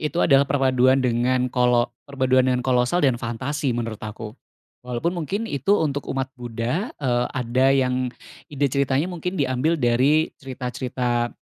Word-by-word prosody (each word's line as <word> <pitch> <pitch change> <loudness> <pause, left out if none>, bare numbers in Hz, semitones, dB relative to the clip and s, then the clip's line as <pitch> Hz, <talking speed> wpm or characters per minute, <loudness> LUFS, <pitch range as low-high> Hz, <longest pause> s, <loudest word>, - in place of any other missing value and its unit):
itu 150 0 -3
adalah 140 -1 +4
perpaduan 130 -1 +3
dengan 125 +1 +1
kolo 125 -1 +2 0.2
perpaduan 130 -2 +2
dengan 125 0 0
kolosal 130 +6 +2
dan 125 -3 +2
fantasi 130 +2 -2
menurut 115 -2 -4
aku. 110 0 -7 0.5
Walaupun 125 +7 -2
mungkin 185 +6 -3
itu 200 +1 +1
untuk 145 -3 -2
umat 135 -1 -3
Buddha, 125 - -3
eee, 125 -3 0
ada 125 +1 +1
yang 130 -2 +1 0.4
ide 145 -1 -2
ceritanya 140 +2 +1
mungkin 180 +2 -4
diambil 140 +4 +1
dari 135 +5 +2
cerita-cerita, 125 -2 -2
130 Hz, 140 wpm, -23 LUFS, 125-140 Hz, 0.5 s, adalah